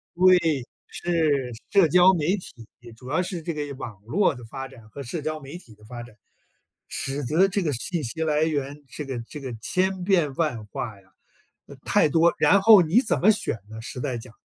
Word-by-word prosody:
对， 170 -7 +4 0.2
是， 155 -7 0 0.2
社 195 -5 +5
交 180 +4 +6
媒 175 +3 +1
体， 120 - -12 0.3
主 125 +2 -11
要 160 +6 +1
是 180 -2 -5
这 170 - -3
个 145 -2 -4
网 110 -7 -8
络 155 - +1
的 125 -3 -11
发 135 +3 -7
展 115 -5 -16
和 140 +6 -8
社 150 +6 -5
交 155 +1 -3
媒 140 +3 -9
体 120 -11 -16
的 105 - -22
发 120 +1 -8
展， 120 -2 -13 0.7
使 135 +1 -3
得 165 +9 +3
这 195 +1 -1
个 155 - 0
信 160 +7 -3
息 160 +7 -3
来 155 0 +1
源， 145 -2 -2
这 150 +2 -7
个 130 -3 -4
这 150 - -8
个 130 -3 -6
千 190 +3 0
变 175 -7 +2
万 125 -10 -1
化 105 -2 -6
呀， 95 - -28 0.6
呃， - - -11
太 155 - +3
多。 165 +3 +4
然 200 -1 +5
后 215 -3 +8
你 175 +8 +3
怎 225 - 0
么 215 +4 +6
选 200 - -2
呢？ 110 0 -9
实 125 +1 -7
在 125 -2 -2
讲， 115 0 -11
150 Hz, 225 characters per minute, -24 LUFS, 125-175 Hz, 0.7 s, 后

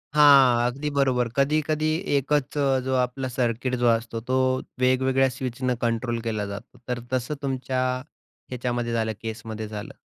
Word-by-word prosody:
हां, 135 -5 +7
अगदी 140 +4 -3
बरोबर. 130 -3 +2
कधी-कधी 155 +2 +1 0.2
एकच 145 +1 0 0.3
जो 130 0 0
आपला 130 +1 -3
सर्किट 125 0 0
जो - - +5
असतो 115 0 0
तो, 130 0 +2 0.2
वेगवेगळ्या 130 +1 +3
स्विचनं 130 -1 -2
कंट्रोल 115 0 -1
केला 110 -3 -2
जातो, 100 +4 -8
तर 125 -1 -2
तसं 130 +4 -1
तुमच्या 130 -1 -2 0.7
ह्याच्यामध्ये 120 -1 -2
झालं, 110 -1 0
केसमध्ये 110 -1 -5
झालं. 105 -1 -7
125 Hz, 135 wpm, -25 LUFS, 115-135 Hz, 0.7 s, हां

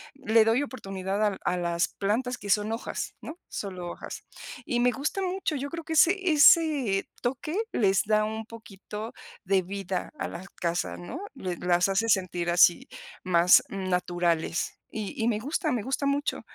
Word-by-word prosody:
le 230 -5 +4
doy 225 +4 +2
oportunidad 195 -6 -3
al 205 -2 0
a 180 - +1
las 170 -1 0
plantas 245 +5 -1
que 200 - -9
son 210 +2 +2
hojas, 230 - -4
¿no?, 325 +3 -8
solo 185 -3 -5
hojas. - - -8 0.4
Y 240 -1 0
me 250 0 +4
gusta 290 +9 -2
mucho, 370 -3 -1
yo 280 +1 -3
creo 335 +1 -6
que 325 - -3
ese 370 +4 +4
ese 290 -9 +5
toque 260 +6 -2 0.2
les 195 -3 +2
da 215 0 +2
un 220 +1 -4
poquito 215 -1 -9 0.3
de 190 0 +3
vida 190 0 -4
a - - -2
las 185 +3 -8
casas, 170 -2 -3
¿no?, 245 - -7
le 185 -9 -4
las 175 +1 +2
hace 200 +4 +1
sentir 180 -4 +1
así, 175 0 +4 0.3
más 180 -1 +5
naturales 175 -3 -1 0.2
y 215 -3 -4
y - - +2
me 215 -3 0
gusta, 295 +5 -1
me 235 -4 -1
gusta 270 +4 -2
mucho, 280 +1 0
210 Hz, 170 wpm, -27 LUFS, 185-265 Hz, 0.4 s, ese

